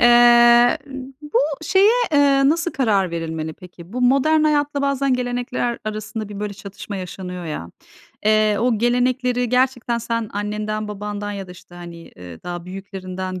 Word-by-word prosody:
Eee, 240 Hz, 0 st, +6 dB, 0.4 s
bu 295 Hz, -, 0 dB, 0.2 s
şeye, 390 Hz, +6 st, +4 dB, 0.2 s
eee, 280 Hz, -1 st, +4 dB
nasıl 335 Hz, +2 st, +1 dB
karar 205 Hz, -9 st, +1 dB
verilmeli 160 Hz, -1 st, -4 dB
peki? 180 Hz, +1 st, -14 dB
Bu 250 Hz, -, -3 dB
modern 275 Hz, +5 st, +3 dB
hayatla 290 Hz, -2 st, +1 dB
bazen 275 Hz, -1 st, +1 dB
gelenekler 245 Hz, -1 st, -2 dB
arasında 215 Hz, 0 st, -5 dB
bir, 205 Hz, 0 st, -7 dB
böyle, 205 Hz, -1 st, -4 dB
çatışma 200 Hz, +1 st, -8 dB
yaşanıyor 180 Hz, -1 st, -6 dB
ya. 120 Hz, -, -6 dB, 0.6 s
Eee, 215 Hz, -1 st, +3 dB
o 235 Hz, -3 st, +1 dB
gelenekleri 245 Hz, +1 st, +1 dB
gerçekten 250 Hz, -1 st, +1 dB
sen 230 Hz, -1 st, -3 dB
annenden, 210 Hz, +1 st, -3 dB
babandan 205 Hz, 0 st, -5 dB
ya 195 Hz, -2 st, -6 dB
da, -, -, -13 dB
işte, 180 Hz, 0 st, -14 dB
hani, 170 Hz, -1 st, -10 dB
ııı, 90 Hz, -2 st, -11 dB
daha 175 Hz, -1 st, -6 dB
büyüklerinden 185 Hz, -1 st, -6 dB
215 Hz, 150 wpm, -21 LUFS, 190-250 Hz, 0.6 s, Eee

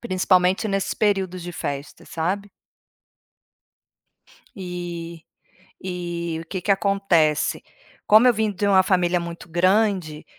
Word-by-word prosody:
principalmente 185 Hz, -1 st, +1 dB
nesses 195 Hz, -1 st, -1 dB
períodos 190 Hz, -4 st, 0 dB
de 175 Hz, -, -7 dB
festa, 140 Hz, -3 st, -6 dB
sabe. 195 Hz, +5 st, -3 dB, 2.1 s
E 175 Hz, -3 st, -6 dB, 0.6 s
e 170 Hz, -2 st, -4 dB
o -, -, -17 dB
que 185 Hz, -, -4 dB
que 205 Hz, -, -2 dB
acontece, 190 Hz, -6 st, +1 dB, 0.4 s
como 215 Hz, +4 st, +6 dB
eu -, -, +6 dB
vim 220 Hz, 0 st, 0 dB
de 200 Hz, +1 st, -2 dB
uma 195 Hz, -2 st, +5 dB
família 180 Hz, -2 st, +1 dB
muito 170 Hz, +1 st, -8 dB
grande, 185 Hz, -2 st, +1 dB
180 Hz, 115 wpm, -23 LUFS, 170-195 Hz, 2.1 s, como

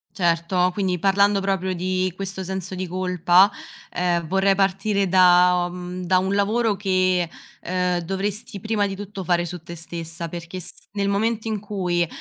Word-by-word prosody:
Certo, 180 Hz, +1 st, +1 dB
quindi 185 Hz, -2 st, 0 dB
parlando 200 Hz, +2 st, +3 dB
proprio 190 Hz, -1 st, -1 dB
di 185 Hz, +1 st, -1 dB
questo 195 Hz, 0 st, -4 dB
senso 190 Hz, 0 st, -5 dB
di 185 Hz, 0 st, -4 dB
colpa, 180 Hz, +2 st, +3 dB, 0.4 s
ehm, 175 Hz, -1 st, 0 dB
vorrei 195 Hz, +2 st, +2 dB
partire 195 Hz, +1 st, +1 dB
da 180 Hz, -1 st, +5 dB
uhm, 180 Hz, 0 st, -6 dB
da 185 Hz, +1 st, +3 dB
un 190 Hz, +2 st, 0 dB
lavoro 210 Hz, +2 st, +1 dB
che, 185 Hz, -3 st, +1 dB, 0.3 s
ehm, 180 Hz, 0 st, 0 dB
dovresti 195 Hz, +4 st, -3 dB
prima 215 Hz, 0 st, 0 dB
di 195 Hz, -, -5 dB
tutto 200 Hz, -1 st, -7 dB
fare 175 Hz, 0 st, +1 dB
su 175 Hz, 0 st, -7 dB
te 170 Hz, +1 st, -9 dB
stessa. 170 Hz, 0 st, -6 dB
Perché 170 Hz, +2 st, -7 dB
s 180 Hz, -, -1 dB, 0.2 s
nel 200 Hz, -1 st, -1 dB
momento 220 Hz, +3 st, 0 dB
in 215 Hz, -2 st, -1 dB
cui, 180 Hz, -4 st, -1 dB
185 Hz, 160 wpm, -23 LUFS, 180-195 Hz, 0.4 s, da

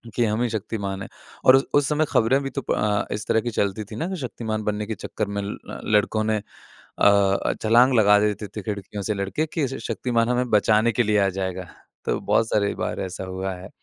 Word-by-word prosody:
कि 120 Hz, -, +2 dB
हम 110 Hz, +2 st, 0 dB
ही 120 Hz, -, 0 dB
शक्तिमान 100 Hz, -3 st, -4 dB
हैं -, -, -9 dB, 0.4 s
और 130 Hz, -, +9 dB
उस 135 Hz, -, +3 dB
उस 145 Hz, -1 st, +4 dB
समय 155 Hz, +1 st, +2 dB
ख़बरे 130 Hz, +5 st, +3 dB
भी 135 Hz, -1 st, -4 dB
तो 140 Hz, -, -4 dB
अ, 105 Hz, -3 st, 0 dB
इस 105 Hz, 0 st, -4 dB
तरह 110 Hz, -, +2 dB
की 120 Hz, -, -3 dB
चलती 100 Hz, 0 st, -1 dB
थीं 105 Hz, -, -6 dB
ना 165 Hz, -, -2 dB
कि 190 Hz, -, -3 dB
शक्तिमान 110 Hz, -3 st, -4 dB
बनने 105 Hz, 0 st, -2 dB
के 110 Hz, -, -3 dB
चक्कर 105 Hz, +2 st, -4 dB
में 100 Hz, 0 st, -3 dB
ल 100 Hz, -, -5 dB, 0.4 s
लड़कों 110 Hz, +1 st, +2 dB
ने 110 Hz, 0 st, +1 dB
अ, 100 Hz, -1 st, 0 dB
छलाँग 120 Hz, +4 st, +5 dB
लगा 105 Hz, -1 st, +6 dB
देते 105 Hz, 0 st, -1 dB
थे 105 Hz, +2 st, -7 dB
खिड़कियों 100 Hz, -1 st, -5 dB
से 105 Hz, -, -1 dB
लड़के 100 Hz, +11 st, -1 dB
कि 150 Hz, -5 st, 0 dB
श 135 Hz, -, -5 dB
शक्तिमान 120 Hz, -2 st, 0 dB
हमें 125 Hz, 0 st, 0 dB
बचाने 110 Hz, +2 st, +4 dB
के 120 Hz, -, +2 dB
लिए 105 Hz, 0 st, +2 dB
आ -, -, +2 dB
जाएगा। 95 Hz, -1 st, -3 dB, 0.4 s
तो -, -, 0 dB
बहुत 115 Hz, -, +2 dB
सारी 100 Hz, -1 st, +1 dB
बार -, -, -3 dB
ऐसा 95 Hz, 0 st, -5 dB
हुआ 95 Hz, +1 st, -4 dB
है। 95 Hz, +2 st, -10 dB
105 Hz, 225 wpm, -24 LUFS, 100-120 Hz, 0.4 s, और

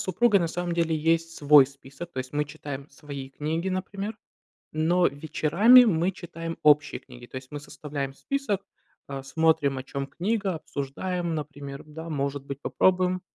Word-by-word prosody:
супругой 200 Hz, +2 st, +3 dB
на 170 Hz, -, +1 dB
самом 175 Hz, 0 st, -3 dB
деле 165 Hz, -1 st, +1 dB
есть 165 Hz, +1 st, +1 dB
свой 145 Hz, -2 st, +7 dB
список, 140 Hz, +5 st, -11 dB
то -, -, -31 dB
есть 130 Hz, 0 st, -4 dB
мы 150 Hz, 0 st, 0 dB
читаем 145 Hz, -2 st, -7 dB
свои 140 Hz, -1 st, -8 dB
книги, 160 Hz, +6 st, -2 dB
например, 195 Hz, +3 st, -3 dB, 0.6 s
но 170 Hz, +3 st, +3 dB
вечерами 170 Hz, -, +5 dB
мы 175 Hz, -1 st, +2 dB
читаем 165 Hz, -2 st, -7 dB
общие 150 Hz, 0 st, +4 dB
книги, 125 Hz, -2 st, -13 dB
то 130 Hz, -, -10 dB
есть 130 Hz, 0 st, -8 dB
мы 145 Hz, -1 st, -6 dB
составляем 145 Hz, -2 st, -5 dB
список, 205 Hz, -, -2 dB, 0.5 s
а, 135 Hz, -1 st, -5 dB
смотрим, 140 Hz, -1 st, +2 dB
о -, -, -4 dB
чём 135 Hz, +1 st, -4 dB
книга, 195 Hz, +1 st, -1 dB
обсуждаем, 170 Hz, +5 st, -3 dB
например, 145 Hz, -2 st, -6 dB
да 160 Hz, +2 st, -8 dB
может 140 Hz, -1 st, -2 dB
быть 140 Hz, 0 st, -6 dB
попробуем. 185 Hz, +1 st, +2 dB
155 Hz, 160 wpm, -26 LUFS, 140-180 Hz, 0.6 s, свой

